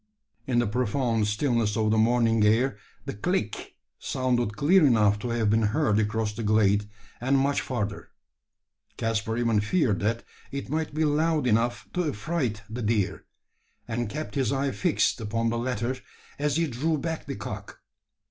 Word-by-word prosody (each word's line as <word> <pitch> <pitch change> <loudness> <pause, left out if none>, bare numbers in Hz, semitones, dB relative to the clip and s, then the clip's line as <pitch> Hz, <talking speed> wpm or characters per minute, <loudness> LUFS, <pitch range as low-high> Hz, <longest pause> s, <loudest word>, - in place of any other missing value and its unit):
In 125 -2 +1
the 120 - +3
profound 115 0 0
stillness 110 -1 0
of 110 -1 +2
the 110 - +3
morning 115 -1 +3
air 115 +4 +3 0.3
the - - -4
"click" 110 - -2 0.2
sounded 120 -4 -1
clear 175 +5 +5
enough 105 -6 +4
to 120 - -4
have 115 -3 +1
been 110 +1 +3
heard 110 0 +2
across 105 0 0
the 110 - -5
glade, 105 -1 +2 0.3
and 135 +3 +2
much 140 +1 +2
further. 105 -5 -4 0.9
Caspar 110 0 -1
even 115 -3 +2
feared 105 - +1
that 115 +3 -1 0.3
it 140 -1 -5
might 155 -1 -2
be 155 0 +2
loud 155 0 +1
enough 120 +1 +1
to 180 - 0
affright 125 -4 -2
the 115 +3 -5
deer; 105 -3 0 0.6
and 120 -1 -2
kept 150 +6 -5
his 135 -5 0
eye 135 0 0
fixed 160 -6 +1
upon 115 +1 -1
the 115 - -1
latter 120 0 -1 0.4
as 145 -1 +1
he 165 +1 +2
drew 150 +4 -1
back 160 +2 -4
the - - -4
cock. - - -7
115 Hz, 165 wpm, -26 LUFS, 110-140 Hz, 0.9 s, clear